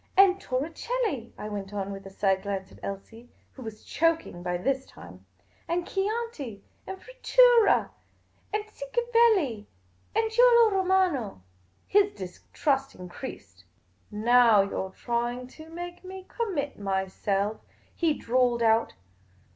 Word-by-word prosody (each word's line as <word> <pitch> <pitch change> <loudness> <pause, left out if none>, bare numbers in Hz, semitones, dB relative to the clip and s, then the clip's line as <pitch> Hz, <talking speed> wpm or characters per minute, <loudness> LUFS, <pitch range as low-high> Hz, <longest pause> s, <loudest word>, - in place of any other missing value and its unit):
" - - -35
And 390 0 +6
Torricelli," 300 - -2
I 210 - -6
went 205 -1 -6
on, 200 0 -3
with 195 0 -8
a - - -8
side 195 -1 +1
glance 195 -1 -4
at - - -16
Elsie, 225 +5 -8 0.2
who 265 - -13
was 220 -3 -8
choking 330 - 0
by 180 0 -2
this 265 +8 -1
time. 90 +2 -14
' 95 -2 -37
' - - -35
And 345 +1 -1
Chianti, 390 - -3 0.2
and 380 0 -6
Frittura, - - +4 0.6
and 425 0 -1
Cinquevalli, 460 - +1 0.5
and 445 0 +1
Giulio 470 -1 +6
Romano." 370 - +1 0.4
His 405 0 +3
distrust 270 +9 -2
increased. 140 - -9 0.3
" 90 - -39
Now 230 -1 +5
you 195 - -5
're 190 - -2
trying 240 +4 -3
to 315 +4 -13
make 350 +2 -8
me 375 0 -9
conmiit 355 - -3
myself," 195 +1 -1 0.3
he 325 -4 +1
drawled 245 -2 +1
out. 225 0 +3
255 Hz, 140 wpm, -27 LUFS, -, 0.6 s, And